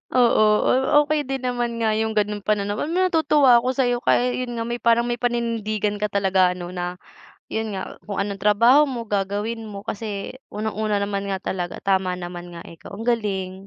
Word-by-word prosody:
Oo, 240 -3 +5 0.6
okey 295 -2 -1
din 270 -1 -3
naman 240 -2 -2
nga 220 - +2
yung 220 0 -1
ganoong 210 0 0
panan 205 0 -1
natutuwa 305 - +3
ako 255 +2 -2
sayo 245 -2 +1
kaya 250 +1 +2
yun 245 -1 -4
nga 230 - -2
may 235 +1 -4
parang 235 0 +3
may 240 0 -2
paninindigan 220 -4 -1
ka 210 - 0
talaga, 190 -2 +2
ano 175 0 -7
na 180 0 -4 0.5
yun 220 -1 -3
nga, 190 -1 -6
kung 200 -1 -3
anong 200 0 -2
trabaho 230 +9 +5
mo, 250 -4 -4
gagawin 205 +3 -2
mo. 200 -2 -8
Kasi 210 +3 -5 0.2
unang-una 215 -1 -1
naman 200 0 -2
nga 195 -1 -2
talaga, 175 -2 -4
tama 190 -2 +1
naman 175 -1 -7
nga 170 - -8
ikaw. 165 +4 -12
Ang 215 - -7
galing. 205 -6 -1
215 Hz, 180 wpm, -23 LUFS, 200-240 Hz, 0.6 s, Oo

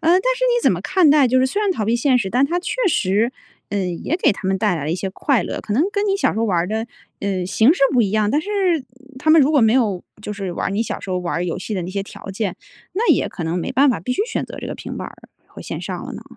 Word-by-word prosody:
但 365 +2 +5 0.2
是 - - 0
你 485 -1 +2
怎 - - +4
么 - - -3
看 370 -5 +3
待 285 -2 +6
就 255 +2 +3
是 260 - +3
虽 405 +11 -2
然 400 - +2
逃 220 - -1
避 225 - +1
现 255 +1 +3
实， 205 -5 -1
但 250 +5 +3
它 345 +5 0
确 360 - -3
实， 215 - +1 0.4
嗯， 185 -4 -2
也 330 - 0
给 365 - +3
他 195 - -6
们 190 0 +1
带 210 -4 +1
来 150 -3 -4
了 155 - -2
一 - - +1
些 195 - -3
快 255 +1 +1
乐， - - -4
可 210 - -5
能 280 +10 +3
跟 410 0 0
你 395 -1 +2
小 395 - +1
时 - - -4
候 225 - +1
玩 185 -6 +1
儿 170 - 0
的， 220 +3 -2 0.3
呃， 190 -3 -2
形 225 - +4
式 360 - -6
不 250 -3 +4
一 200 - 0
样， 215 -1 +1
但 295 - +2
是 375 - -9 0.7
他 310 - +1
们 320 0 +7
如 280 +1 +4
果 290 - +5
没 220 0 +4
有 210 -8 +1 0.2
就 210 - -5
是 195 -2 -4
玩 - - -2
儿 - - -2
你 205 +3 0
小 - - -4
时 190 - -7
候 180 - 0
玩 180 -1 -3
儿 175 - -1
游 175 0 -3
戏 205 +3 -5
的 185 - -2
那 180 - -5
些 200 +1 -2
条 195 - -12
件， 195 -1 -3 0.4
那 435 +6 +1
也 - - +1
可 175 - -6
能 165 +2 -1
没 - - -3
办 275 +3 +4
法 240 - +1
必 250 +9 -2
须 410 - 0
选 465 - -3
择 - - -10
这 - - -6
个 - - -5
平 - - -7
板 - - -5
儿 - - -12 0.3
和 - - -12
线 - - -5
上 - - -5
了 - - -7
呢？ - - -8
220 Hz, 340 characters per minute, -20 LUFS, 190-290 Hz, 0.7 s, 们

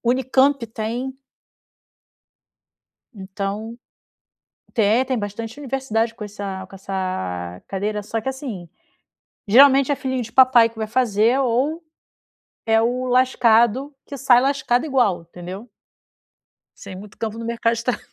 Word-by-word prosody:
Unicamp 260 +1 +2
tem. 240 +4 -4 2.0
Então, 200 +4 -5 1.0
tem, 225 +3 +3
tem 260 -2 -1
bastante 220 +4 -6
universidade 255 -5 -2
com 220 -2 -7
essa 200 -2 -6
com 195 - -15
essa 95 - -4
cadeira, 210 +2 -3
só 225 +2 -3
que 265 - -4
assim, 245 - -6 0.8
geralmente 275 +5 +6
é - - 0
filhinho 260 -1 -2
de 230 0 -9
papai 255 -3 +6
que 225 0 -17
vai 220 - -2
fazer, 230 +1 +2
ou 270 +7 0 0.8
é 225 0 +3
o 250 +2 0
lascado 250 +1 +3
que 280 - -8
sai 250 -2 +5
lascado 270 -1 +1
igual 240 - +1
entendeu? 180 +6 -9 1.1
Sem 185 - -10
muito 205 0 -13
campo 225 0 -4
no 230 - -6
mercado 230 0 0
de 230 - -5
tra 250 - 0
230 Hz, 130 wpm, -21 LUFS, 205-260 Hz, 2.0 s, geralmente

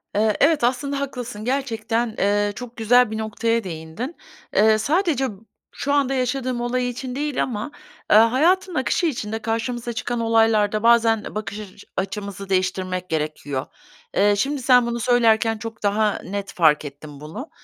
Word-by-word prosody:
Eee, 215 0 +2
evet 300 -2 +3
aslında 275 +3 0
haklısın, 245 -6 -5
gerçekten, 230 -4 -1
eee, 205 +1 +2
çok 245 0 -9
güzel 235 +1 +4
bir 220 - -3
noktaya 230 +1 -1
değindin. 175 - -6 0.4
Eee, 215 +1 +5
sadece 280 - +1
b - - -10 0.5
şu 285 0 0
anda 275 -2 +2
yaşadığım 255 -1 -1
olay 245 +1 -1
için 250 +1 -6
değil 295 -1 -1
ama, 235 +3 -4 0.4
eee, - - +8
hayatın 330 - +3
akışı 260 +6 +1
içinde 220 -6 -3
karşımıza 230 +2 -3
çıkan 240 0 -3
olaylarda 225 -2 +2
bazen 230 -2 +4
e - - -8
bakış 215 0 -4
açı 200 -3 -11
açımızı 195 0 -4
değiştirmek 185 -1 -1
gerekiyor. 150 -3 -3 0.5
Eee, 205 0 +4
şimdi 280 +4 -1
sen 250 -1 +5
bunu 235 0 -2
söylerken 225 -2 +3
çok 225 -1 -8
daha 210 +1 +1
net 200 +1 -5
fark 155 -3 +3
ettim 145 0 -10
bunu. 190 - -8
225 Hz, 155 wpm, -22 LUFS, 205-250 Hz, 0.5 s, eee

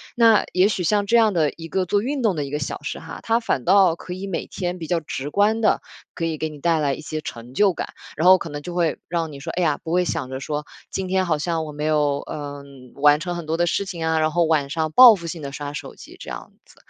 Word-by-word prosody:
那 230 -3 +5
也 185 +2 +4
许 200 -4 -1
像 205 +3 +2
这 235 +4 +3
样 220 -3 +4
的 160 -4 +2
一 165 0 -10
个 185 +2 -1
做 200 +3 +1
运 270 +4 -2
动 215 -6 +2
的 150 - -2
一 135 - -8
个 150 - -2
小 145 - -4
时 - - -4
哈， - - -9
它 230 +1 +2
反 225 - -1
倒 190 -3 +5
可 180 - -8
以 190 +2 -6
每 190 - -3
天 180 -1 -4
比 160 - -6
较 175 0 +1
直 145 -2 -5
观 210 +6 +2
地 215 - +3 0.3
可 165 - -3
以 160 -1 -2
给 155 +1 -2
你 150 -1 -11
带 165 +2 +2
来 145 -2 +1
一 - - -7
些 155 0 -5
成 120 -3 -8
就 195 +5 +3
感。 - - -5 0.3
然 165 +4 +1
后 185 0 +9
可 170 - -7
能 145 0 -6
就 175 +4 -7
会 170 -3 0
让 165 -2 -2
你 140 - -9
说， 140 - -5
哎 180 - -1
呀， 150 -3 +2
不 160 - -5
会 180 +1 +2
想 130 - -3
着 130 0 -5
说 150 +2 -4 0.2
今 190 -1 -3
天 190 0 +1
好 160 -3 +1
像 165 +1 -2
我 150 - -7
没 150 +1 -4
有， 150 -2 +2
呃， 145 -1 -6 0.3
完 145 +1 +5
成 175 +2 -4
很 170 -2 -6
多 160 +1 -1
的 175 0 +2
事 200 +4 0
情 170 -4 -5
啊， 160 0 +1
然 155 0 +1
后 175 +2 +2
晚 155 -3 +1
上 155 +1 -1
报 245 +3 +9
复 170 -3 -8
性 165 0 -6
地 140 -1 -6
刷 145 +1 -6
手 145 - -7
机 - - -13
这 - - -9
样 - - -8
子。 - - -21
165 Hz, 310 characters per minute, -22 LUFS, 150-185 Hz, 0.3 s, 后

